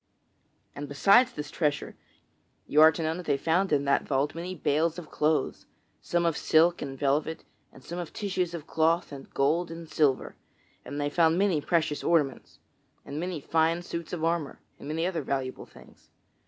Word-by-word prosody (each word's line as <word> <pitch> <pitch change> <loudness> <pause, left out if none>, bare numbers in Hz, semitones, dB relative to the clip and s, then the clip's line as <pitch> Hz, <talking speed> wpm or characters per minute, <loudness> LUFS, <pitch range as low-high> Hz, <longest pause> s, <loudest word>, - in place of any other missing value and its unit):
And 145 0 -6
besides 200 - +5
this 150 0 -7
treasure, 150 -4 -1 0.7
you 150 - +3
are 160 0 +9
to 165 +1 -4
know 160 +1 -1
that 180 - -8
they 140 - +2
found 165 +6 +1
in 140 -1 +2
that 140 - +3
vault 140 +1 -1
many 175 +3 -5
bales 160 +1 0
of 170 -3 -9
cloths 155 +1 0 0.3
some 175 0 0
of 165 -2 +1
silk 165 +3 +3
and 135 -2 -5
velvet, 150 +4 0 0.3
and 130 - -16
some 170 +7 -6
of 170 -3 -6
tissues 185 -4 -2
of 155 -3 -7
cloth 165 +1 +1
of 140 -1 -10
gold 160 +5 +1
and 165 0 -8
silver; 145 -4 +1 0.5
and 145 - -6
they 145 0 -1
found 165 +1 +3
many 190 -6 +2
precious 155 -2 0
ornaments, 150 -6 0 0.5
and 145 +2 -5
many 175 -1 -3
fine 165 +3 +1
suits 170 -2 -6
of 170 -3 -4
armor, 165 -3 -1 0.2
and - - -9
many 160 +3 -1
other 175 -3 -1
valuable 135 -2 -3
things. - - -18
160 Hz, 180 wpm, -28 LUFS, 145-170 Hz, 0.7 s, are